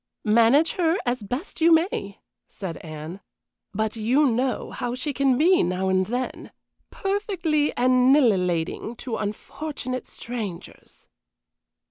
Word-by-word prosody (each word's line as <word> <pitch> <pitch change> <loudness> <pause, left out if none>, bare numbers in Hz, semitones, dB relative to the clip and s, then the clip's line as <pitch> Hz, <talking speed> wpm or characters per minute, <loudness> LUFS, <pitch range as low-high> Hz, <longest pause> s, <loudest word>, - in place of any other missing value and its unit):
"Manage 235 - +4
her 340 -1 +2
as 245 -1 -1
best 250 - -5
you 335 +1 +6
may," 320 - +1 0.3
said 185 -5 -6
Anne. 155 +3 -8 0.5
"But 220 +2 -2
you 245 +7 +2
know 255 0 0
how 245 0 -3
she 280 +3 -3
can 270 -2 +2
be 355 +6 +4
now 185 +2 0
and 185 0 +2
then 250 +3 -4 0.4
perfectly 375 -7 0
annihilating 240 - +2
to 235 -1 -5
unfortunate 255 +5 -5
strangers." 220 -8 -8
245 Hz, 115 wpm, -24 LUFS, 205-295 Hz, 0.5 s, you